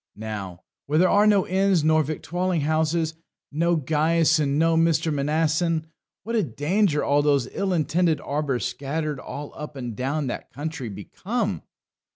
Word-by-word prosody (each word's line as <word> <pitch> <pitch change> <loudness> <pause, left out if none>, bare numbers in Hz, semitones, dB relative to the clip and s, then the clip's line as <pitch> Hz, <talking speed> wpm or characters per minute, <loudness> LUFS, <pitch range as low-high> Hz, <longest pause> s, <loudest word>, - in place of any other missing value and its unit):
Now, 100 -4 -6 0.2
where 150 +2 +1
there 180 +2 +5
are 205 +1 +5
no 205 -3 +4
inns 190 -3 +2
nor 155 0 +4
victualling 170 +3 -2
houses, 160 +2 0 0.4
no 170 +3 +1
Gaius 160 +2 +2
and 140 -1 +1
no 165 +1 +3
Mr. 165 -1 +2
Mnason, 160 +3 +1 0.4
what 230 +1 -3
a 220 - +3
danger 155 - +1
all 145 +1 +3
those 140 -4 +2
ill 195 -1 -1
intended 165 -1 +1
arbours 140 -4 -2
scattered 150 +1 -3
all 145 +3 -7
up 150 -1 -8
and 120 -4 -5
down 140 +5 -1
that 125 - -5
country 145 -4 -5
become! 200 - -3
155 Hz, 155 wpm, -24 LUFS, 145-170 Hz, 0.4 s, there